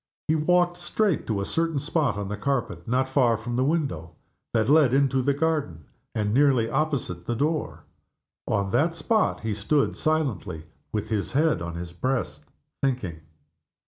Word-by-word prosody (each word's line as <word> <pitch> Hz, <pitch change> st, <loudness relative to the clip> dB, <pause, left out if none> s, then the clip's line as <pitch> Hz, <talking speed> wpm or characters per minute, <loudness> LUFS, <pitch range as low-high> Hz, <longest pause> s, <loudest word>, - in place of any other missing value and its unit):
He 155 Hz, -, +3 dB
walked 175 Hz, +3 st, +2 dB
straight 180 Hz, +1 st, 0 dB
to 105 Hz, -3 st, -1 dB
a -, -, -2 dB
certain 165 Hz, +3 st, -1 dB
spot 145 Hz, -4 st, 0 dB
on 100 Hz, -1 st, -3 dB
the 105 Hz, -, -3 dB
carpet, 110 Hz, -8 st, -2 dB
not 130 Hz, +3 st, +1 dB
far 125 Hz, -4 st, +3 dB
from 120 Hz, +2 st, -4 dB
the 130 Hz, -, +2 dB
window 135 Hz, -, -1 dB, 0.4 s
that 110 Hz, -2 st, +1 dB
led 145 Hz, -3 st, +5 dB
into 135 Hz, -1 st, +3 dB
the 140 Hz, +2 st, +1 dB
garden, 145 Hz, -, -1 dB, 0.3 s
and 105 Hz, -1 st, 0 dB
nearly 130 Hz, -3 st, +4 dB
opposite 125 Hz, -, -2 dB
the 120 Hz, -, 0 dB
door. 150 Hz, +5 st, -1 dB, 0.6 s
On 100 Hz, -1 st, 0 dB
that 155 Hz, +9 st, +2 dB
spot 215 Hz, +3 st, +1 dB
he 110 Hz, -2 st, -2 dB
stood 135 Hz, +8 st, +1 dB
silently, 135 Hz, -, -1 dB, 0.3 s
with 105 Hz, -2 st, -3 dB
his 105 Hz, 0 st, -2 dB
head 150 Hz, -, +2 dB
on 85 Hz, 0 st, -5 dB
his 85 Hz, 0 st, -6 dB
breast 85 Hz, -, -2 dB, 0.4 s
thinking. 120 Hz, -12 st, -1 dB
130 Hz, 165 wpm, -25 LUFS, 100-155 Hz, 0.6 s, led